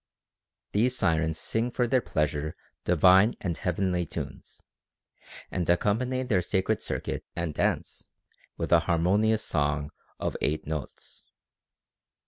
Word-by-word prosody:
These 125 +5 +2
Sirens 80 -5 +1
sing 115 +7 -1
for 125 0 0
their 130 +1 +3
pleasure 75 -3 -1 0.3
divine 95 +5 +5
and 85 -4 -2
heavenly 90 -1 -1
tunes, - - -7 0.9
and 90 -2 -2
accompany 120 +9 +1
their 110 -8 +1
sacred 95 +4 0
circuit - - -3
and 85 -3 -2
dance - - -1 0.5
with - - -3
an - - +6
harmonious 100 +6 +2
song 75 -1 0 0.3
of - - -2
eight 75 +1 -1
notes. 75 -3 -7
90 Hz, 115 wpm, -28 LUFS, 80-110 Hz, 0.9 s, an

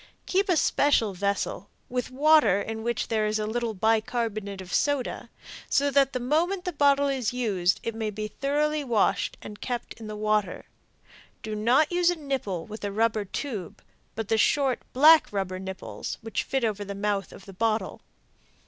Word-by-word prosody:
Keep 385 +1 +1
a 350 - +4
special 280 -8 +2
vessel, 200 +1 -2 0.2
with 250 0 -3
water 280 -7 +4
in 220 +2 -4
which 235 0 -2
there 215 -1 +1
is 215 +1 0
a 215 - -2
little 230 0 -2
bicarbonate 220 -1 -1
of 185 -1 -8
soda, 285 -3 0 0.4
so 285 0 +2
that 275 -1 +4
the 255 - -2
moment 340 +9 0
the 360 - -2
bottle 285 -1 +3
is 260 -5 -1
used 195 -8 +1
it 230 - -3
may 220 -1 -3
be 215 +1 -4
thoroughly 295 +6 -1
washed 230 -6 +1
and 210 - -10
kept 245 -2 -4
in 220 - -8
the 215 - -6
water. 210 -3 0 0.8
Do 220 - -4
not 245 +9 +3
use 350 0 +3
a 355 - +1
nipple 265 - -3
with 215 0 -9
a 205 - -2
rubber 220 0 +1
tube, 205 - -6 0.3
but 225 -2 -4
the 225 +1 +1
short, 270 +1 +2
black 305 +3 +6
rubber 190 -2 -3
nipples, 190 0 -6
which 225 -1 -3
fit 270 -2 -1
over 210 -2 -1
the 200 0 -6
mouth 200 -2 -1
of 195 - -13
the 195 - -11
bottle. 220 +3 -1
225 Hz, 180 wpm, -26 LUFS, 210-275 Hz, 0.8 s, black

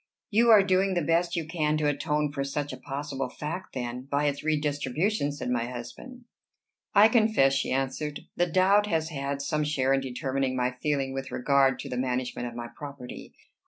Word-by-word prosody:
"You 230 +3 +4
are 215 -3 +8
doing 190 0 +2
the 175 - +1
best 170 +2 +1
you 165 -2 -1
can 155 -2 0
to 155 - -1
atone 150 0 0
for 140 -1 -2
such 145 +1 -3
a - - -6
possible 135 -1 -4
fact, 155 +8 -6
then, 125 +1 -4
by 145 +1 +1
its 145 -1 -1
redistribution," 150 - 0
said 140 -3 -4
my 120 -1 0
husband. 125 - -9 0.7
"I 205 +2 +9
confess," 220 - +4
she 135 - 0
answered, 135 +3 -2
"the 175 - +2
doubt 190 +4 +4
has 160 -4 0
had 140 -2 -3
some 150 0 0
share 135 -3 +1
in 135 - +2
determining 130 0 -2
my 125 0 +1
feeling 140 -3 0
with 135 0 -4
regard 135 0 +3
to - - -7
the 125 - -3
management 125 -1 -2
of 120 - -8
my 120 0 -5
property. 140 -4 -9
145 Hz, 190 wpm, -27 LUFS, 135-165 Hz, 0.7 s, I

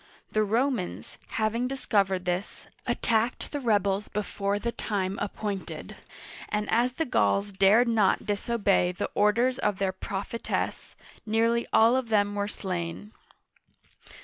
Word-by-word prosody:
The 215 - +2
Romans, 230 -1 -1 0.2
having 225 +3 +1
discovered 195 -8 0
this, 180 +2 -3 0.2
attacked 230 +1 0
the 290 - -2
rebels 205 -4 +1
before 200 -1 -2
the 235 +3 -2
time 195 -4 -2
appointed, 205 -1 -4 0.5
and 210 0 -1
as 245 +2 +3
the 325 +5 -1
Gauls 200 - +1
dared 200 +5 +5
not 220 -4 +2
disobey 205 -3 +1
the - - -4
orders 235 +5 +2
of 210 -2 0
their 195 -1 0
prophetess, 200 +4 -4 0.3
nearly 230 +2 +2
all 230 +3 +5
of 260 -3 -1
them 205 -2 +2
were 205 0 -1
slain. 185 0 -4
210 Hz, 125 wpm, -27 LUFS, 195-235 Hz, 0.5 s, dared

